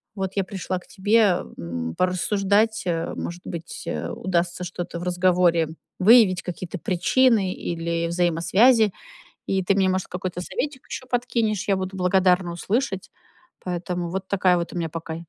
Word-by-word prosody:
Вот 190 -2 -3
я 195 - +1
пришла 185 -1 -4
к - - -21
тебе, 205 -2 +2 0.2
м, 85 -1 -4
порассуждать, 200 +4 +1
э, 165 -1 -1
может 175 +1 -5
быть, 170 0 -7 0.3
удастся 175 -1 -1
что-то 175 -1 -5
в - - -6
разговоре 175 -2 +2 0.3
выявить, 195 -3 +6
какие-то 180 0 -6
причины 195 +3 +2
или 170 0 -2
взаимосвязи, 180 +7 +3 0.6
и 190 -1 0
ты 190 - +2
мне, 190 -1 +2
может, 185 0 0
какой-то 180 0 -5
советик 265 +8 -4
еще 255 - -7
подкинешь, 235 -5 -1
я 200 - +3
буду 190 0 -4
благодарна 180 -1 +3
услышать, 195 +3 -2 0.6
поэтому 175 -1 -3
вот 190 +1 -4
такая 185 -2 +3
вот 170 0 -3
у - - -5
меня 165 -2 -2
пока, 160 0 -6
185 Hz, 150 wpm, -24 LUFS, 175-200 Hz, 0.6 s, выявить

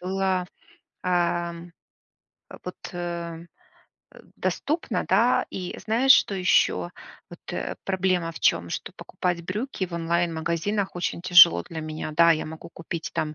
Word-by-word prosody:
было, 185 0 -1 0.6
эм, 175 -1 -1 0.8
а, - - -10
вот, 180 - -6 0.2
э, 170 -1 -5 0.7
э, - - -13 0.2
доступно, 315 +3 -2
да. - - +3
И 180 -1 -5
знаешь, 240 +5 +5
что 200 - +3
еще? 135 - +2 0.4
Вот, - - -12
э, - - -3
проблема 185 -3 0
в - - -9
чём? 85 +1 +2
Что - - -5
покупать 175 -1 -3
брюки 205 +1 -3
в 175 - -16
онлайн-магазинах 170 +3 -1
очень 175 -1 -3
тяжело 170 - +7
для 160 -1 -6
меня. 155 0 -5
Да, 170 0 +6
я 155 - +1
могу 160 +1 -9
купить 165 0 -6
там, 155 0 -2
175 Hz, 140 wpm, -25 LUFS, 165-185 Hz, 0.8 s, тяжело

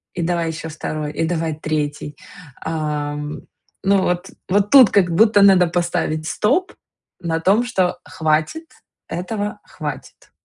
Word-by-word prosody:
и 175 - -2
давай 170 0 0
еще 160 0 -5
2, 155 -1 -4
и 165 - -1
давай 165 -2 -1
3. 150 -1 -3 0.4
А, 150 -2 -2
м, 150 0 -6 0.4
ну, 195 0 +3
вот 180 +2 -1 0.2
вот 205 +2 +2
тут 260 -6 +9
как 180 -4 +2
будто 210 +3 +5
надо 190 -3 +6
поставить 170 -2 -1
стоп 270 - 0 0.5
на 165 -2 -1
том, 195 +8 +3
что 185 -7 0
хватит, 160 - -1 0.4
этого 205 +3 -4
хватит. - - -8
175 Hz, 140 wpm, -20 LUFS, 155-200 Hz, 0.5 s, тут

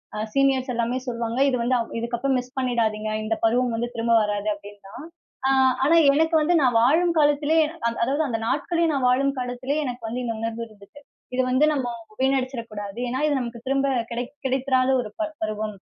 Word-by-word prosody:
அ - - -4 0.2
seniors 270 -1 +2
எல்லாமே 235 +1 -1
சொல்லுவாங்க. 235 -1 -3
"இது 255 - 0
வந்து 245 +2 +1
அ - - 0 0.2
இதுக்கு 235 +1 -3
அப்பறம் 270 +2 0
மிஸ் 250 +1 -9
பண்ணிடாதீங்க. 225 -4 0
இந்த 220 +1 -1
பருவம் 240 +2 +2
வந்து 235 +1 -2
திரும்ப 230 0 0
வராது." 205 0 -2
அப்படின்னு 205 0 -12
தான். 280 - -9 0.4
ஆ - - +3 0.4
ஆனா 320 +4 +4 0.2
எனக்கு 320 +3 +2
வந்து 320 +4 +2
நான் 250 -4 +3
வாழும் 335 +8 +3
காலத்திலே, 295 +1 +3 0.3
அ - - +3
அதாவது 280 +6 +1
அந்த 230 -3 -2
நாட்களே 335 +6 0
நான் 265 -3 +1
வாழும் 275 +2 +2
காலத்திலே 250 +3 -3
எனக்கு 245 -3 -5
வந்து 245 +3 -3
இந்த 230 -1 -2
உணர்வு 230 0 -3
இருந்ததுச்சு. 215 +6 -17 0.3
இத 260 - +3
வந்து 260 +4 +4
நம்ம 265 -4 -1 0.3
வீணடிச்சிர 265 -2 0
கூடாது. 205 0 -7
ஏன்னா, 255 +2 -2
இது 290 -3 +1
நமக்கு 235 -1 -7
திரும்ப 275 +1 +1 0.2
கிடை 240 +1 -2 0.2
கிடைத்திராத 260 0 +1
ஒரு 215 - -8
பர் 315 -1 -2
பருவம். 215 -1 -3
250 Hz, 195 wpm, -24 LUFS, 230-275 Hz, 0.4 s, ஆனா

